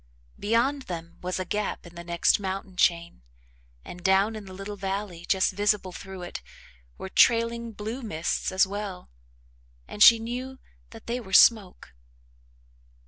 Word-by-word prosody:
Beyond 235 +7 +1
them 170 -1 -7
was 180 +1 -3
a 185 - -3
gap 210 +1 -3
in 170 - -13
the 170 0 -9
next 170 +3 +2
mountain 190 -1 -5
chain 170 - +1 0.6
and 175 0 -10
down 195 +4 +3
in 215 -2 -8
the 190 - -11
little 195 +2 -7
valley, 195 -3 -5
just 190 0 +2
visible 205 -1 0
through 190 +1 -9
it, 175 - -7 0.6
were - - -7
trailing 230 +3 +2
blue 220 +5 -6
mists 170 -8 -2
as 190 +1 +4
well, 195 - -7 0.8
and 210 - -9
she 230 +2 +10
knew 250 +4 -6 0.3
that 225 -1 -13
they 240 +2 -3
were 190 -6 -11
smoke. 200 - +4
195 Hz, 150 wpm, -26 LUFS, 180-225 Hz, 0.8 s, she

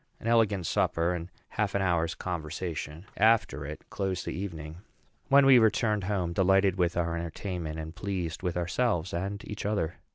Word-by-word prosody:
An - - -12
elegant 110 -6 +3
supper, 85 +3 +1
and 85 0 -5 0.2
half 105 -2 -1
an 100 - +2
hour's 85 -3 +1
conversation 80 -1 -5
after 100 -10 +3
it, 75 - -7
closed 95 -2 -2
the - - -3
evening; 80 -4 -6 0.5
when 140 0 +6
we 135 -2 +8
returned 110 -2 +2
home, 90 -4 -1
delighted 95 +1 +3
with 90 -1 +1
our 85 -1 0
entertainment, 85 -1 -4
and 80 0 -6
pleased 90 -4 -3
with 90 -2 -2
ourselves 90 0 0
and 100 +4 -3
each 105 - -5
other. 100 -6 -1
90 Hz, 165 wpm, -29 LUFS, 85-100 Hz, 0.5 s, we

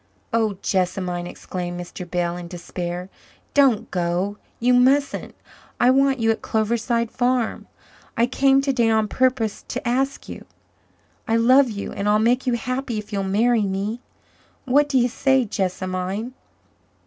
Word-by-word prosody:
"Oh, 220 -4 +1
Jessamine," 180 -2 -1
exclaimed 175 0 -6
Mr. 175 0 -8
Bell 175 -1 -1
in 175 -1 -7
despair, 175 0 -5 0.5
"don't 270 -7 +3
go 180 +3 -1 0.2
you 250 +2 +3
mustn't. 270 +3 +2 0.4
I 245 - +5
want 270 0 +3
you 225 -2 +2
at 220 - -3
Cloverside 230 +1 0
Farm. 250 -2 0 0.5
I 230 - +4
came 270 +2 +3
today 260 -5 +1
on 220 -1 +2
purpose 250 -2 0
to 255 0 -4
ask 270 +3 -1
you. - - -9 0.8
I 225 - +2
love 255 +3 +5
you 200 -2 -5
and 200 +1 -2
I'll 210 - +4
make 240 +4 +1
you 250 - +2
happy 250 0 -2
if 210 0 -7
you'll 200 - 0
marry 225 +4 +2
me. 200 +5 -3 0.6
What 285 +3 +3
do 270 - +2
you 245 -1 +4
say, 265 +1 +2
Jessamine?" 190 +3 -3
225 Hz, 150 wpm, -22 LUFS, 190-255 Hz, 0.8 s, I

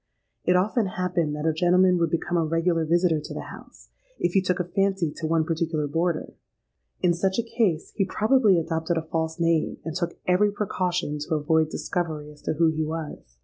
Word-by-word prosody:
It 180 - +4
often 205 +4 +2
happened 175 -5 -1
that 150 +1 -4
a 160 - +2
gentleman 180 +2 +4
would 170 - +2
become 170 +1 -1
a 170 - +3
regular 165 +1 +1
visitor 170 0 +2
to 150 - -8
the - - -6
house, - - -15 0.3
if 175 - 0
he 195 - +4
took 180 0 -1
a - - +1
fancy 190 -2 0
to 160 - -3
one 160 0 +2
particular 160 -2 -1
boarder: 165 +3 -1 0.7
in 175 -1 +4
such 190 +2 0
a 235 - +1
case 220 -8 0
he 200 - +2
probably 215 0 +3
adopted 165 +1 -1
a 160 - -1
false 160 0 -3
name, 165 -2 +1
and 160 -1 -4
took 170 -2 -2
every 195 +3 +3
precaution 180 -6 -2
to 150 +2 -2
avoid 155 +1 +2
discovery 155 -4 -3
as 150 - -17
to - - -1
who 165 +1 +3
he 160 0 -1
was. 155 0 -6
170 Hz, 200 wpm, -25 LUFS, 160-180 Hz, 0.7 s, It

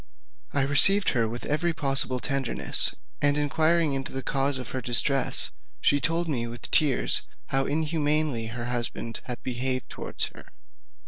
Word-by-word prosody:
I 140 - +1
received 175 +8 +5
her 115 -4 0
with 120 +2 -7
every 165 +3 0
possible 135 -3 +2
tenderness, 135 -2 0 0.3
and 145 0 +3
inquiring 155 +1 +2
into 135 0 -4
the 135 0 -5
cause 135 +1 0
of 125 -3 -7
her 130 - -4
distress, 125 +3 +1 0.3
she 145 - +2
told 165 +4 0
me 120 -6 -2
with 120 +1 -9
tears 145 -5 +4 0.2
how 135 0 0
inhumanly 150 -5 0
her 120 +1 -6
husband 120 -1 -2
had 125 -2 -6
behaved 130 0 -3
towards - - -3
her. - - -14
135 Hz, 150 wpm, -26 LUFS, 125-150 Hz, 0.3 s, received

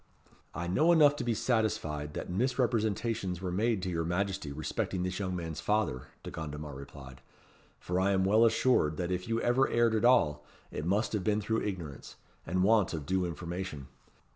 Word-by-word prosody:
"I 85 - -3
know 150 - +3
enough 150 -4 +6
to 135 - -3
be 120 -2 0
satisfied 80 - -1
that - - -4
misrepresentations 110 -3 0
were 90 -1 -3
made 105 +1 0
to 95 - -2
your 85 -1 -1
Majesty 95 -1 -2
respecting 80 +5 -2
this 90 +1 -3
young 95 -2 -2
man's 80 -2 -4
father," 105 -12 0 0.2
De - - -7
Gondomar 75 -1 -6
replied; 65 -1 -11 0.6
"for 90 +1 -2
I 95 +1 +2
am 95 -1 +2
well 110 +4 +5
assured 115 -9 +3
that 90 0 -2
if 90 0 -2
you 115 0 0
ever 130 +2 +3
erred 120 -1 +3
at 110 - +1
all, 75 -13 +4 0.3
it 75 - -4
must 100 +3 +1
have 105 -4 -1
been 105 +1 +1
through 110 +2 -1
ignorance, 85 -9 -6 0.3
and 90 +2 +1
want 105 -4 +3
of 75 -3 -5
due 95 +3 0
information. 85 -3 -6
95 Hz, 185 wpm, -31 LUFS, 80-110 Hz, 0.6 s, enough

